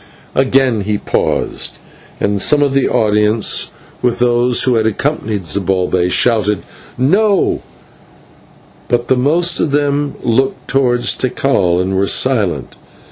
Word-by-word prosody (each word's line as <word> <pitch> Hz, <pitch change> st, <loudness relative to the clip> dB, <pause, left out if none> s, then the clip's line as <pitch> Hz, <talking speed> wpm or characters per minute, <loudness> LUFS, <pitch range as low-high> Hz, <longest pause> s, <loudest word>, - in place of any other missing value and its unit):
Again 130 Hz, -4 st, +2 dB
he 105 Hz, +1 st, -1 dB
paused, -, -, -2 dB, 0.4 s
and 100 Hz, -1 st, 0 dB
some 145 Hz, +5 st, +3 dB
of 140 Hz, -2 st, 0 dB
the 135 Hz, -1 st, +1 dB
audience, 105 Hz, 0 st, +1 dB, 0.3 s
with 125 Hz, -1 st, 0 dB
those 120 Hz, 0 st, +2 dB
who 130 Hz, -, +2 dB
had 110 Hz, -1 st, +1 dB
accompanied 110 Hz, -4 st, -2 dB
Zibalbay, 90 Hz, +1 st, 0 dB
shouted 105 Hz, 0 st, +2 dB, 0.3 s
"No;" 195 Hz, -, +2 dB, 1.3 s
but 120 Hz, 0 st, -1 dB
the 130 Hz, -, +4 dB
most 165 Hz, +7 st, +1 dB
of -, -, +1 dB
them 145 Hz, 0 st, 0 dB
looked 130 Hz, +3 st, 0 dB
towards 125 Hz, -2 st, +1 dB
Tikal 100 Hz, -9 st, 0 dB
and 95 Hz, +1 st, -1 dB
were 100 Hz, +1 st, +1 dB
silent. 100 Hz, -, 0 dB
120 Hz, 125 wpm, -15 LUFS, 105-135 Hz, 1.3 s, the